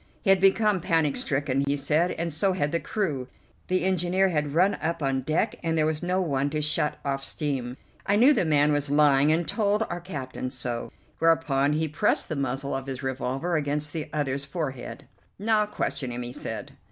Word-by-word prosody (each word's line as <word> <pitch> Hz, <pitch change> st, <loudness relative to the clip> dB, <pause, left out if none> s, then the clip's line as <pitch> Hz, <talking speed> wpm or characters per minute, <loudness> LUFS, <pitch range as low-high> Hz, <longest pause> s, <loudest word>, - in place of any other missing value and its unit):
He 195 Hz, -, +4 dB
had 190 Hz, -1 st, +4 dB
become 195 Hz, 0 st, +3 dB
panic 160 Hz, -5 st, +1 dB
stricken, 140 Hz, -1 st, 0 dB
he 140 Hz, -, +2 dB
said, 150 Hz, +5 st, +2 dB
and 170 Hz, -1 st, -3 dB
so 190 Hz, +5 st, +1 dB
had 150 Hz, -5 st, -1 dB
the 170 Hz, -, 0 dB
crew. 155 Hz, -, -2 dB, 0.4 s
The 185 Hz, 0 st, +1 dB
engineer 185 Hz, +1 st, +2 dB
had 150 Hz, -3 st, -1 dB
run 185 Hz, +4 st, +4 dB
up 165 Hz, -1 st, -2 dB
on 135 Hz, -1 st, 0 dB
deck, 155 Hz, +5 st, 0 dB
and 165 Hz, -1 st, -1 dB
there 155 Hz, -, +3 dB
was 155 Hz, -1 st, -1 dB
no 180 Hz, +1 st, 0 dB
one 145 Hz, -6 st, 0 dB
to 155 Hz, +1 st, -2 dB
shut 150 Hz, 0 st, 0 dB
off 135 Hz, -1 st, -1 dB
steam. 135 Hz, -5 st, -2 dB, 0.3 s
I 200 Hz, -, +3 dB
knew 250 Hz, +8 st, +6 dB
the 225 Hz, -, +2 dB
man 150 Hz, -2 st, +3 dB
was 145 Hz, -1 st, 0 dB
lying, 145 Hz, 0 st, +4 dB
and 165 Hz, 0 st, +1 dB
told 210 Hz, +4 st, +1 dB
our 175 Hz, 0 st, -4 dB
captain 135 Hz, -7 st, -5 dB
so, 125 Hz, -2 st, -4 dB, 0.3 s
whereupon 150 Hz, -4 st, +2 dB
he 160 Hz, +1 st, 0 dB
pressed 150 Hz, -, +1 dB
the 155 Hz, -, -2 dB
muzzle 140 Hz, 0 st, -2 dB
of 135 Hz, 0 st, -4 dB
his 135 Hz, 0 st, -5 dB
revolver 135 Hz, +5 st, -2 dB
against 150 Hz, 0 st, -1 dB
the 155 Hz, -2 st, -4 dB
other's 140 Hz, -2 st, -1 dB
forehead. 145 Hz, -2 st, -5 dB, 0.3 s
"Now 210 Hz, +1 st, +2 dB
question 135 Hz, -9 st, -2 dB
him," 120 Hz, 0 st, -4 dB
he 120 Hz, -, -6 dB
said. 110 Hz, -4 st, -5 dB
150 Hz, 200 wpm, -26 LUFS, 135-175 Hz, 0.4 s, knew